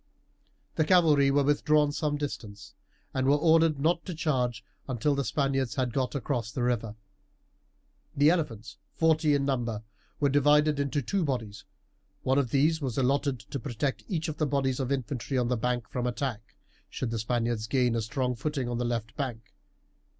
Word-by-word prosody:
The 155 Hz, -, +4 dB
cavalry 155 Hz, -5 st, +5 dB
were 140 Hz, +1 st, +3 dB
withdrawn 150 Hz, +1 st, +3 dB
some 145 Hz, 0 st, -1 dB
distance, 110 Hz, -8 st, -6 dB, 0.4 s
and 130 Hz, 0 st, 0 dB
were 140 Hz, -, +5 dB
ordered 160 Hz, -1 st, +4 dB
not 165 Hz, +4 st, +1 dB
to 180 Hz, -, -5 dB
charge 130 Hz, -7 st, -1 dB, 0.2 s
until 130 Hz, +3 st, +1 dB
the 140 Hz, 0 st, 0 dB
Spaniards 135 Hz, +2 st, 0 dB
had 125 Hz, -3 st, -1 dB
got 130 Hz, +1 st, -1 dB
across 120 Hz, -4 st, -2 dB
the 125 Hz, -, -2 dB
river. 115 Hz, -3 st, -1 dB, 1.2 s
The 145 Hz, +3 st, +6 dB
elephants, 115 Hz, -, -3 dB, 0.2 s
forty 160 Hz, -2 st, +3 dB
in 140 Hz, -1 st, 0 dB
number, 120 Hz, -6 st, -1 dB, 0.4 s
were 145 Hz, -, +3 dB
divided 145 Hz, +1 st, +4 dB
into 140 Hz, 0 st, -1 dB
two 195 Hz, +8 st, 0 dB
bodies. 110 Hz, -8 st, -3 dB, 0.6 s
One 130 Hz, +2 st, +3 dB
of 130 Hz, -4 st, 0 dB
these 155 Hz, +5 st, +2 dB
was 130 Hz, -5 st, -3 dB
allotted 135 Hz, -1 st, +1 dB
to 135 Hz, +6 st, -6 dB
protect 130 Hz, +2 st, -3 dB
each 170 Hz, -5 st, -2 dB
of 155 Hz, -2 st, -4 dB
the 155 Hz, -, +1 dB
bodies 135 Hz, -2 st, 0 dB
of 130 Hz, 0 st, -2 dB
infantry 135 Hz, 0 st, -2 dB
on 120 Hz, -1 st, +1 dB
the 125 Hz, -, +2 dB
bank 120 Hz, 0 st, -1 dB
from 125 Hz, -1 st, -2 dB
attack, 120 Hz, -3 st, -4 dB, 0.3 s
should 125 Hz, -3 st, -4 dB
the 115 Hz, -, -2 dB
Spaniards 115 Hz, -1 st, -1 dB
gain 125 Hz, -1 st, +2 dB
a 115 Hz, -, 0 dB
strong 125 Hz, +3 st, -1 dB
footing 135 Hz, +1 st, -3 dB
on 120 Hz, -1 st, -2 dB
the 125 Hz, -, -1 dB
left 115 Hz, -2 st, -3 dB
bank. 120 Hz, -5 st, -5 dB
135 Hz, 175 wpm, -28 LUFS, 120-145 Hz, 1.2 s, The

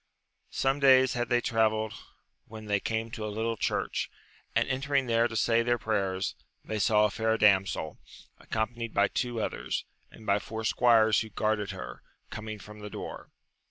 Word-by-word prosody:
Some 135 Hz, +1 st, 0 dB
days 130 Hz, -2 st, +6 dB
had 120 Hz, -1 st, -2 dB
they 120 Hz, -1 st, +3 dB
travelled 110 Hz, -2 st, +1 dB, 0.5 s
when 110 Hz, 0 st, -9 dB
they 105 Hz, -1 st, +1 dB
came 110 Hz, +2 st, -2 dB
to 110 Hz, -, -5 dB
a 110 Hz, -, -2 dB
little 110 Hz, +2 st, -2 dB
church, -, -, -1 dB, 0.5 s
and -, -, +3 dB
entering 135 Hz, +1 st, 0 dB
there 115 Hz, 0 st, +3 dB
to 115 Hz, -, -8 dB
say 115 Hz, +1 st, +3 dB
their 120 Hz, +1 st, +1 dB
prayers, 100 Hz, -4 st, -1 dB, 0.3 s
they 110 Hz, -, -3 dB
saw 105 Hz, 0 st, +4 dB
a 105 Hz, -, 0 dB
fair 110 Hz, +1 st, +1 dB
damsel, 95 Hz, -7 st, +2 dB, 0.4 s
accompanied 115 Hz, +1 st, -3 dB
by 100 Hz, 0 st, +4 dB
two 120 Hz, -2 st, -2 dB
others, -, -, -3 dB, 0.2 s
and 110 Hz, -, -15 dB
by 100 Hz, 0 st, +3 dB
four 110 Hz, +1 st, -6 dB
squires 110 Hz, -1 st, +4 dB
who 110 Hz, -, -5 dB
guarded 105 Hz, 0 st, -1 dB
her, -, -, -7 dB, 0.3 s
coming 110 Hz, 0 st, -6 dB
from 105 Hz, +1 st, -12 dB
the 105 Hz, 0 st, -7 dB
door. -, -, -7 dB
110 Hz, 170 wpm, -29 LUFS, 105-115 Hz, 0.5 s, days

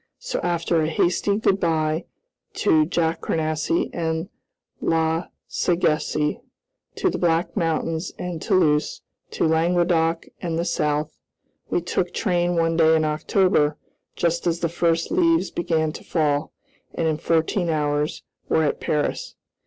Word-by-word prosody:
So, -, -, -4 dB
after 170 Hz, -1 st, 0 dB
a 155 Hz, -, +1 dB
hasty 180 Hz, +5 st, +1 dB
good 200 Hz, -3 st, +2 dB
by 160 Hz, -2 st, 0 dB, 0.5 s
to 155 Hz, -7 st, +3 dB
Jacournassy 160 Hz, -1 st, 0 dB
and 160 Hz, +1 st, -2 dB, 0.5 s
La 160 Hz, +1 st, +1 dB, 0.2 s
Sagesse, 155 Hz, -3 st, 0 dB, 0.6 s
to -, -, +1 dB
the -, -, -3 dB
Black 170 Hz, 0 st, +1 dB
Mountains 165 Hz, -1 st, -1 dB
and 175 Hz, -3 st, -5 dB
Toulouse, 150 Hz, -4 st, +1 dB, 0.3 s
to -, -, -1 dB
Languedoc 165 Hz, 0 st, +2 dB, 0.2 s
and 165 Hz, -2 st, -2 dB
the 170 Hz, -, -1 dB
South, 150 Hz, -3 st, -1 dB, 0.5 s
we -, -, +1 dB
took 175 Hz, +1 st, -2 dB
train 175 Hz, -3 st, +1 dB
one 165 Hz, 0 st, +1 dB
day 160 Hz, -1 st, +5 dB
in 155 Hz, -1 st, +2 dB
October, 155 Hz, 0 st, +2 dB, 0.4 s
just 170 Hz, 0 st, 0 dB
as 170 Hz, 0 st, 0 dB
the 170 Hz, -, +1 dB
first 165 Hz, 0 st, 0 dB
leaves 335 Hz, -2 st, +2 dB
began 160 Hz, -2 st, 0 dB
to -, -, -10 dB
fall, 150 Hz, -2 st, 0 dB, 0.4 s
and, 165 Hz, -, 0 dB
in 155 Hz, -1 st, 0 dB
fourteen 165 Hz, +3 st, 0 dB
hours, 150 Hz, -1 st, -1 dB, 0.3 s
were 160 Hz, -, +3 dB
at 150 Hz, -, 0 dB
Paris. 150 Hz, -1 st, -2 dB
165 Hz, 135 wpm, -23 LUFS, 155-175 Hz, 0.6 s, day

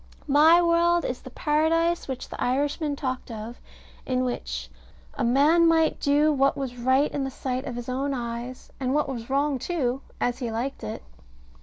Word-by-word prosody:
My 315 Hz, +4 st, +6 dB
world 340 Hz, 0 st, +3 dB
is 250 Hz, -, -3 dB
the 260 Hz, -, -10 dB
Paradise 320 Hz, +5 st, +1 dB
which 260 Hz, -2 st, -5 dB
the -, -, -7 dB
Irishman 285 Hz, +3 st, 0 dB
talked 260 Hz, -3 st, -4 dB
of, 225 Hz, +1 st, -7 dB, 0.4 s
in 255 Hz, -1 st, 0 dB
which -, -, -4 dB, 0.5 s
"a -, -, -3 dB
man 295 Hz, +8 st, +4 dB
might 325 Hz, -1 st, +3 dB
do 295 Hz, +2 st, +3 dB
what 275 Hz, 0 st, +2 dB
was 265 Hz, -3 st, -4 dB
right 260 Hz, +4 st, +2 dB
in 280 Hz, -, -2 dB
the 270 Hz, -, -2 dB
sight 260 Hz, 0 st, -4 dB
of 250 Hz, -, -5 dB
his 240 Hz, -1 st, -6 dB
own 270 Hz, +3 st, -1 dB
eyes, 240 Hz, 0 st, -5 dB
and 260 Hz, 0 st, 0 dB
what 300 Hz, -, +1 dB
was 240 Hz, -3 st, -6 dB
wrong 280 Hz, 0 st, +1 dB
too, 270 Hz, -5 st, -1 dB, 0.2 s
as 245 Hz, +1 st, -1 dB
he 245 Hz, -3 st, -3 dB
liked 245 Hz, +5 st, -4 dB
it." 105 Hz, -10 st, -5 dB
270 Hz, 180 wpm, -25 LUFS, 245-300 Hz, 0.5 s, My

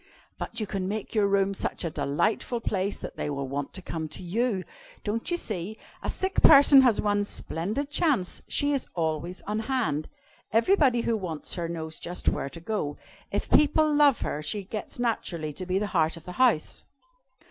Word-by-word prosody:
"But -, -, -4 dB
you 215 Hz, -, -1 dB
can 190 Hz, -2 st, -3 dB
make 210 Hz, +1 st, -4 dB
your 210 Hz, -3 st, +3 dB
room 195 Hz, 0 st, +2 dB
such 190 Hz, -, -3 dB
a 165 Hz, -, -2 dB
delightful 215 Hz, -, 0 dB
place, 200 Hz, -2 st, -1 dB
that -, -, -8 dB
they -, -, -2 dB
will 140 Hz, -2 st, -3 dB
want 140 Hz, +1 st, -3 dB
to 185 Hz, -, -5 dB
come 160 Hz, -3 st, -4 dB
to 155 Hz, -, -6 dB
you! 200 Hz, +2 st, 0 dB, 0.4 s
Don't 220 Hz, +2 st, -2 dB
you 345 Hz, -, +1 dB
see, 210 Hz, -, -3 dB, 0.2 s
a -, -, -3 dB
sick 380 Hz, 0 st, 0 dB
person 280 Hz, -2 st, +9 dB
has 245 Hz, -5 st, +4 dB
one 205 Hz, -1 st, +2 dB
splendid 205 Hz, -, -3 dB
chance 285 Hz, -, +1 dB
she 290 Hz, 0 st, +2 dB
is 275 Hz, -, -1 dB
always 165 Hz, +2 st, -2 dB
on 210 Hz, +1 st, -2 dB
hand. 220 Hz, -, -1 dB, 0.4 s
Everybody 250 Hz, -, +4 dB
who 230 Hz, -, +1 dB
wants 175 Hz, -7 st, -4 dB
her 170 Hz, -2 st, -2 dB
knows 160 Hz, -1 st, -4 dB
just 175 Hz, +1 st, -5 dB
where 140 Hz, -, +1 dB
to 165 Hz, -, -9 dB
go. 165 Hz, -6 st, -3 dB, 0.3 s
If -, -, -2 dB
people 305 Hz, +1 st, +5 dB
love 290 Hz, -3 st, +5 dB
her, 150 Hz, -, -2 dB
she 195 Hz, +7 st, -3 dB
gets 210 Hz, +2 st, -6 dB
naturally 175 Hz, -10 st, -2 dB
to 185 Hz, +4 st, -6 dB
be 185 Hz, +1 st, +1 dB
the 210 Hz, -, 0 dB
heart 165 Hz, -1 st, +2 dB
of 165 Hz, -, -13 dB
the 180 Hz, -, -6 dB
house. 235 Hz, -12 st, +3 dB
200 Hz, 190 wpm, -27 LUFS, 165-240 Hz, 0.4 s, person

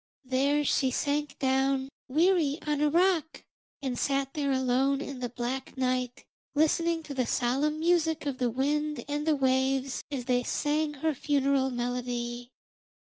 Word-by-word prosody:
There 275 Hz, +3 st, +2 dB
she 265 Hz, -1 st, +2 dB
sank 290 Hz, +3 st, -1 dB
down, 265 Hz, 0 st, +1 dB, 0.2 s
weary, 315 Hz, 0 st, +2 dB
on 295 Hz, -1 st, 0 dB
a 300 Hz, -, +4 dB
rock, 340 Hz, -1 st, +1 dB, 0.4 s
and 255 Hz, -3 st, -2 dB
sat 275 Hz, -1 st, 0 dB
there 285 Hz, -2 st, -1 dB
alone 260 Hz, +1 st, +2 dB
in 280 Hz, -2 st, -6 dB
the 245 Hz, -1 st, -3 dB
black 250 Hz, +3 st, -4 dB
night, 255 Hz, -1 st, -1 dB, 0.3 s
listening 330 Hz, +2 st, +2 dB
to 290 Hz, -, -7 dB
the 255 Hz, -3 st, -1 dB
solemn 275 Hz, +5 st, +1 dB
music 320 Hz, -2 st, +1 dB
of 275 Hz, -3 st, -3 dB
the 250 Hz, -1 st, +1 dB
wind 295 Hz, +4 st, -1 dB
and 295 Hz, +1 st, -2 dB
the 310 Hz, -, +4 dB
waves, 265 Hz, 0 st, +1 dB
as 270 Hz, -4 st, -4 dB
they 250 Hz, -1 st, +2 dB
sang 295 Hz, +4 st, -1 dB
her 315 Hz, +3 st, 0 dB
funeral 275 Hz, -1 st, +1 dB
melody. 245 Hz, -1 st, -3 dB
275 Hz, 150 wpm, -29 LUFS, 255-300 Hz, 0.4 s, a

